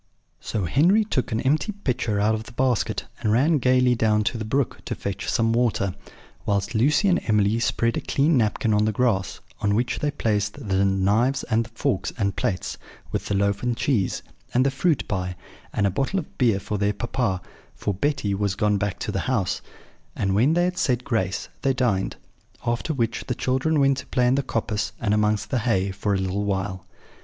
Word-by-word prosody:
So 105 Hz, -4 st, -2 dB
Henry 175 Hz, -, +4 dB
took 130 Hz, -, -1 dB
an 110 Hz, -, 0 dB
empty 150 Hz, +9 st, +1 dB
pitcher 125 Hz, -, -1 dB
out 105 Hz, +2 st, +3 dB
of 110 Hz, 0 st, -3 dB
the 115 Hz, -, -12 dB
basket, 120 Hz, -4 st, 0 dB
and 110 Hz, -3 st, 0 dB
ran 145 Hz, +7 st, +3 dB
gaily 125 Hz, 0 st, +4 dB
down 110 Hz, -2 st, +2 dB
to 115 Hz, -, -1 dB
the -, -, -3 dB
brook 130 Hz, +4 st, -1 dB
to -, -, -3 dB
fetch -, -, -4 dB
some 115 Hz, 0 st, +2 dB
water, 115 Hz, -5 st, +1 dB, 0.5 s
whilst 100 Hz, +1 st, -1 dB
Lucy 145 Hz, -, +3 dB
and 180 Hz, -2 st, +3 dB
Emily 105 Hz, 0 st, +3 dB
spread 115 Hz, 0 st, +1 dB
a -, -, -1 dB
clean 150 Hz, +3 st, +2 dB
napkin 110 Hz, -1 st, +1 dB
on 105 Hz, 0 st, +3 dB
the 110 Hz, -, +2 dB
grass, 105 Hz, -4 st, 0 dB, 0.2 s
on 100 Hz, -1 st, +1 dB
which 120 Hz, +2 st, 0 dB
they 150 Hz, -, 0 dB
placed 105 Hz, -7 st, -1 dB
the 95 Hz, 0 st, +2 dB
knives 100 Hz, +8 st, +2 dB
and 115 Hz, +1 st, +2 dB
forks 100 Hz, -, -1 dB
and 100 Hz, -4 st, 0 dB
plates, 90 Hz, -2 st, -2 dB, 0.3 s
with -, -, -2 dB
the 100 Hz, -, 0 dB
loaf 100 Hz, 0 st, +1 dB
and 120 Hz, -1 st, -1 dB
cheese, 115 Hz, -10 st, 0 dB, 0.3 s
and 130 Hz, +2 st, +4 dB
the 135 Hz, -, +3 dB
fruit 150 Hz, +2 st, +1 dB
pie, 90 Hz, -4 st, -2 dB, 0.4 s
and 100 Hz, -, 0 dB
a 100 Hz, -, +2 dB
bottle 135 Hz, -, -1 dB
of 165 Hz, -, -5 dB
beer 115 Hz, -6 st, +3 dB
for 105 Hz, +1 st, -3 dB
their 100 Hz, 0 st, +1 dB
papa; 115 Hz, -2 st, -1 dB, 0.4 s
for 105 Hz, -, -2 dB
Betty 105 Hz, -1 st, 0 dB
was 100 Hz, 0 st, 0 dB
gone 105 Hz, -1 st, +1 dB
back 100 Hz, -1 st, -2 dB
to -, -, -2 dB
the -, -, -1 dB
house; 100 Hz, -8 st, 0 dB, 0.5 s
and 95 Hz, -1 st, 0 dB
when 125 Hz, +11 st, +3 dB
they 175 Hz, -, +3 dB
had 180 Hz, +1 st, -1 dB
said 125 Hz, -7 st, +1 dB
grace, 100 Hz, -8 st, -1 dB
they 135 Hz, -1 st, +2 dB
dined: 115 Hz, -7 st, 0 dB, 0.5 s
after 120 Hz, +7 st, -1 dB
which 120 Hz, -5 st, -1 dB
the 125 Hz, -, -1 dB
children 130 Hz, +6 st, +1 dB
went 135 Hz, -1 st, +3 dB
to -, -, -7 dB
play 125 Hz, -, +1 dB
in 125 Hz, -, +4 dB
the 140 Hz, -, +2 dB
coppice 110 Hz, -5 st, -2 dB
and 105 Hz, -2 st, +1 dB
amongst 105 Hz, 0 st, +1 dB
the 130 Hz, -, +2 dB
hay, 100 Hz, -4 st, +1 dB
for 100 Hz, +1 st, -1 dB
a -, -, +1 dB
little 95 Hz, +2 st, -1 dB
while. 95 Hz, -2 st, -2 dB
115 Hz, 205 wpm, -24 LUFS, 100-130 Hz, 0.5 s, Henry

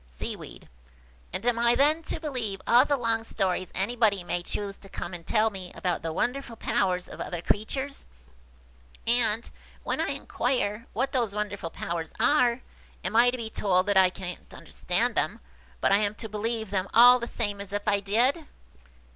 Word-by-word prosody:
Seaweed. -, -, -7 dB, 0.6 s
"And -, -, -4 dB
am 240 Hz, -1 st, +2 dB
I 235 Hz, 0 st, +4 dB
then 300 Hz, +5 st, +4 dB
to -, -, -1 dB
believe 250 Hz, -, -2 dB
all 245 Hz, +3 st, +6 dB
the 285 Hz, -1 st, +1 dB
long 230 Hz, -2 st, 0 dB
stories 185 Hz, -4 st, -1 dB
anybody 205 Hz, -1 st, +1 dB
may 175 Hz, 0 st, -1 dB
choose 200 Hz, +3 st, -4 dB
to 195 Hz, -, -15 dB
come 175 Hz, -, -6 dB
and 170 Hz, -2 st, -9 dB
tell 220 Hz, 0 st, +2 dB
me 185 Hz, -3 st, -8 dB
about 180 Hz, -2 st, -2 dB
the 165 Hz, -, -3 dB
wonderful 245 Hz, +6 st, -2 dB
powers 180 Hz, -4 st, 0 dB
of -, -, -9 dB
other 175 Hz, -, -4 dB
creatures?–and, 65 Hz, -, -1 dB, 0.3 s
when -, -, -1 dB
I -, -, 0 dB
inquire 230 Hz, -4 st, -2 dB
what 265 Hz, +5 st, -1 dB
those 235 Hz, -6 st, -1 dB
wonderful 205 Hz, -4 st, -3 dB
powers 165 Hz, -1 st, -5 dB
are, 250 Hz, -4 st, +3 dB, 0.4 s
am 185 Hz, +4 st, -3 dB
I 240 Hz, +2 st, +7 dB
to 250 Hz, -, -3 dB
be 225 Hz, -2 st, -6 dB
told 185 Hz, -3 st, +1 dB
that 205 Hz, -1 st, 0 dB
I 190 Hz, -1 st, +6 dB
can't 180 Hz, -1 st, -8 dB
understand -, -, -1 dB
them, -, -, 0 dB, 0.4 s
but -, -, +2 dB
am 205 Hz, +1 st, +2 dB
to 225 Hz, -, -6 dB
believe 220 Hz, 0 st, -3 dB
them 190 Hz, -1 st, -1 dB
all 245 Hz, +2 st, +8 dB
the 235 Hz, -, -4 dB
same 205 Hz, -4 st, -2 dB
as 200 Hz, -1 st, -9 dB
if 205 Hz, +1 st, -4 dB
I 205 Hz, -1 st, +3 dB
did?" 245 Hz, +10 st, +1 dB
210 Hz, 175 wpm, -27 LUFS, 185-240 Hz, 0.6 s, all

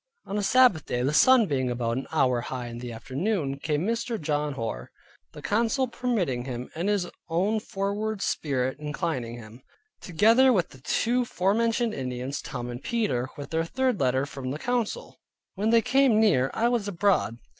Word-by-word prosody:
On 200 Hz, -, -5 dB
a 210 Hz, -, 0 dB
Sabbath 225 Hz, -, +4 dB
day, 125 Hz, 0 st, -1 dB
the 140 Hz, +3 st, 0 dB
sun 250 Hz, -, +6 dB
being 135 Hz, -7 st, -1 dB
about 120 Hz, -1 st, -1 dB
an 130 Hz, -, -4 dB
hour 125 Hz, -3 st, +2 dB
high 125 Hz, 0 st, -5 dB
in 120 Hz, 0 st, -7 dB
the 120 Hz, -1 st, -6 dB
afternoon, 140 Hz, -, -2 dB
came 150 Hz, +3 st, -1 dB
Mr. 230 Hz, 0 st, -2 dB
John 150 Hz, -2 st, -1 dB
Hoar 85 Hz, -, -5 dB, 0.4 s
(the -, -, -11 dB
council 235 Hz, +5 st, +1 dB
permitting 205 Hz, -, -1 dB
him, 125 Hz, -1 st, -6 dB
and 175 Hz, +5 st, -2 dB
his 200 Hz, -4 st, +1 dB, 0.2 s
own 195 Hz, +7 st, +1 dB
foreward 210 Hz, +1 st, -3 dB
spirit 130 Hz, -2 st, -1 dB
inclining 150 Hz, -6 st, -3 dB
him), 115 Hz, +1 st, -12 dB, 0.4 s
together 225 Hz, +8 st, +4 dB
with 185 Hz, -9 st, +1 dB
the 130 Hz, -, -16 dB
two 245 Hz, -, +1 dB
forementioned 230 Hz, +2 st, +1 dB
Indians, 130 Hz, +1 st, -4 dB
Tom 120 Hz, -, -6 dB
and 120 Hz, +2 st, -7 dB
Peter, 135 Hz, -, -1 dB
with 145 Hz, -, -8 dB
their 165 Hz, 0 st, +1 dB
third 255 Hz, +6 st, 0 dB
letter 130 Hz, +1 st, +1 dB
from 135 Hz, -2 st, -6 dB
the 140 Hz, -, -3 dB
council. 245 Hz, +4 st, -3 dB, 0.3 s
When 205 Hz, +3 st, -1 dB
they 230 Hz, 0 st, +4 dB
came 265 Hz, -4 st, +4 dB
near, 135 Hz, -12 st, +3 dB
I 230 Hz, -, +1 dB
was 240 Hz, -4 st, 0 dB
abroad. 195 Hz, -, +1 dB
165 Hz, 175 wpm, -26 LUFS, -, 0.4 s, sun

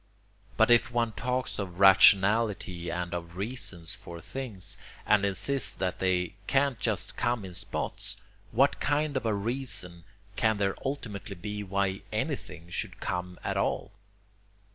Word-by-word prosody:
But -, -, +5 dB
if 120 Hz, 0 st, +6 dB
one 120 Hz, -1 st, +1 dB
talks 125 Hz, +5 st, -2 dB
of 90 Hz, -3 st, -5 dB
rationality 95 Hz, -2 st, +5 dB
and 90 Hz, +1 st, -3 dB
of 85 Hz, -1 st, -5 dB
reasons 95 Hz, -6 st, -3 dB
for 85 Hz, -1 st, -9 dB
things, 100 Hz, -2 st, -6 dB, 0.3 s
and 105 Hz, -1 st, +4 dB
insists 120 Hz, +7 st, +1 dB
that 95 Hz, -1 st, -2 dB
they 90 Hz, -1 st, +1 dB
can't 135 Hz, -3 st, +2 dB
just 105 Hz, -5 st, -1 dB
come 120 Hz, -4 st, 0 dB
in 90 Hz, -, -8 dB
spots, -, -, -4 dB, 0.3 s
what -, -, +3 dB
KIND 145 Hz, +1 st, +1 dB
of 130 Hz, -3 st, 0 dB
a 110 Hz, -, +2 dB
reason 100 Hz, -6 st, -2 dB, 0.3 s
can 110 Hz, -1 st, +2 dB
there 100 Hz, -1 st, +1 dB
ultimately 110 Hz, -8 st, -4 dB
be 105 Hz, +3 st, -5 dB
why 100 Hz, -1 st, -1 dB
anything 85 Hz, +2 st, -3 dB
should -, -, -4 dB
come 90 Hz, 0 st, -3 dB
at -, -, -1 dB
all? -, -, 0 dB
100 Hz, 140 wpm, -29 LUFS, 90-120 Hz, 0.3 s, if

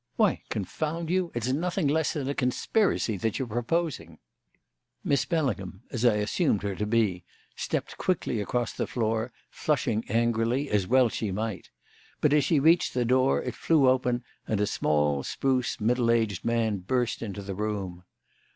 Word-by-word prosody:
Why, -, -, +2 dB
confound 155 Hz, -, -3 dB
you, 185 Hz, -2 st, +1 dB
it's 120 Hz, +2 st, -1 dB
nothing 175 Hz, +2 st, 0 dB
less 155 Hz, +2 st, +1 dB
than 145 Hz, -4 st, -3 dB
a 140 Hz, -, 0 dB
conspiracy 125 Hz, -, +1 dB
that 110 Hz, +3 st, -1 dB
you're 130 Hz, -, -2 dB
proposing!" 120 Hz, -, -2 dB, 0.9 s
Miss 140 Hz, -, +1 dB
Bellingham 125 Hz, -, -2 dB
as 120 Hz, -2 st, -3 dB
I 120 Hz, -3 st, +5 dB
assumed 105 Hz, -, +1 dB
her 100 Hz, -1 st, -1 dB
to 105 Hz, +3 st, -3 dB
be 105 Hz, -6 st, +1 dB, 0.3 s
stepped -, -, -3 dB
quickly 145 Hz, -, 0 dB
across 120 Hz, +3 st, -1 dB
the -, -, -2 dB
floor, 115 Hz, 0 st, -1 dB, 0.2 s
flushing 120 Hz, -7 st, 0 dB
angrily, 115 Hz, +4 st, +1 dB
as 100 Hz, -3 st, +1 dB
well 130 Hz, +2 st, +5 dB
she 110 Hz, -1 st, -3 dB
might; 110 Hz, 0 st, -4 dB, 0.5 s
but, 150 Hz, -1 st, +3 dB
as 150 Hz, -1 st, +4 dB
she 160 Hz, -, +3 dB
reached 165 Hz, +2 st, +3 dB
the 125 Hz, -1 st, +1 dB
door, 130 Hz, +2 st, +3 dB
it -, -, -3 dB
flew 155 Hz, -5 st, +3 dB
open 125 Hz, -1 st, +2 dB, 0.2 s
and 110 Hz, -, 0 dB
a 105 Hz, -, +3 dB
small, 75 Hz, -6 st, +1 dB
spruce, 130 Hz, -, -1 dB
middle 120 Hz, +2 st, +2 dB
aged 110 Hz, -5 st, +1 dB
man 115 Hz, -3 st, +1 dB
burst 120 Hz, +6 st, -1 dB
into 100 Hz, -2 st, -5 dB
the 100 Hz, 0 st, -5 dB
room. 95 Hz, -3 st, -4 dB
120 Hz, 165 wpm, -27 LUFS, 105-140 Hz, 0.9 s, I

